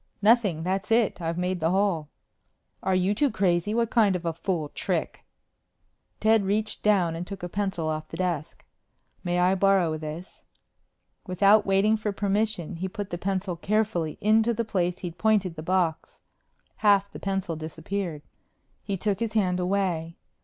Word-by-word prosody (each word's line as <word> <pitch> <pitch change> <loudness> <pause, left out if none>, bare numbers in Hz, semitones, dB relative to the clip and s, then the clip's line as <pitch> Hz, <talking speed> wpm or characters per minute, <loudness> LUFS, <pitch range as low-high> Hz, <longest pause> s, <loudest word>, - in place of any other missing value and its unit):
"Nothing. 205 -8 +3
That's 190 +4 -2
it. 225 -5 +2
I've 165 0 -2
made 180 0 -1
the 160 0 +1
hole." 185 -5 +1 0.7
"Are 190 - +1
you 185 +2 +2
two 280 +7 +2
crazy? 185 -3 +1
What 230 -1 +1
kind 210 -5 +4
of 175 -1 -4
a 165 - 0
fool 165 -2 -2
trick - - -3 0.5
?" - - -47
Ted 220 -1 +4
reached 210 +2 -1
down 185 -6 +2
and 175 +2 -5
took 195 -2 -8
a - - -2
pencil 190 -4 -2
off 155 0 -3
the - - -8
desk. 175 -5 -3 0.6
"May 175 -1 0
I 180 +1 +3
borrow 190 -4 +2
this?" 155 +4 -8 0.8
Without 200 +3 +4
waiting 200 +3 +3
for 210 -1 -2
permission, 200 -3 -1
he 185 +3 -3
put 205 0 -6
the 175 - -4
pencil 190 -1 -2
carefully 185 -4 -1
into 220 +2 +3
the 230 +1 -1
place 180 -4 -1
he'd 175 -2 -7
pointed 205 -6 +2
the 155 - -6
box. 175 -1 -1 0.5
Half 200 -2 +3
the - - -9
pencil 195 -4 -2
disappeared. 160 +1 -5 0.6
He 200 -2 -3
took 200 +1 -1
his 230 -2 -2
hand 185 -4 +1
away. 180 -3 -1
190 Hz, 165 wpm, -26 LUFS, 170-205 Hz, 0.8 s, kind